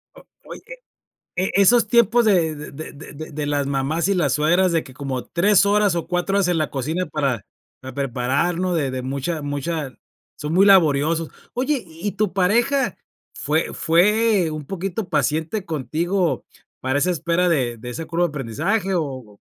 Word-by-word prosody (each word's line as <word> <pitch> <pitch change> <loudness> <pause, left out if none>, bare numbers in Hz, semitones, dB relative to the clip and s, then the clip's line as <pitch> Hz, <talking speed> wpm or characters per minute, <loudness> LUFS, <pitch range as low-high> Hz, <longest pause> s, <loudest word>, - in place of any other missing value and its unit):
O - - -15 0.2
oye, - - -9 0.7
e 185 +2 0
esos 220 +4 +5
tiempos 235 +1 +4
de 170 -7 +3 0.2
de 155 +3 -8
de 150 +2 -11
de 155 +2 -8
de 150 0 -3
las 145 -1 0
mamás 140 +5 0
y 200 - +2
las 155 -8 +1
suegras 175 +6 +3
de 165 -2 +1
que 130 - -13
como 130 -3 -4
3 200 +3 +3
horas 205 -3 +3
o 170 - -3
4 180 +2 -1
horas 195 - +2
en 175 -2 +1
la 155 -3 0
cocina 155 +7 -2
para 140 - -2 0.4
para 130 -1 -8
prepararnos, 140 +8 0
de 140 -5 0
de 130 0 -3
mucha 140 +5 -3
mucha 145 0 -3 0.4
son 150 +2 -4
muy 195 +3 +5
laboriosos. 160 -3 +4 0.2
Oye, 265 +1 -1
¿y 170 +4 -5
tu 205 -1 -1
pareja 235 +9 +1 0.4
fue 155 +2 -1
fue 200 +2 +3
un 155 -2 -6
poquito 195 +2 -4
paciente 160 +6 -1
contigo 165 +1 -1 0.3
para 130 +2 0
esa 180 +5 +2
espera 170 +2 +1
de 125 -8 0
de 125 +2 -8
ese 160 +7 -5
curva 170 +2 0
de - - -1
aprendizaje?, 160 - -2
o 130 -10 -4
165 Hz, 170 wpm, -22 LUFS, 145-190 Hz, 0.7 s, esos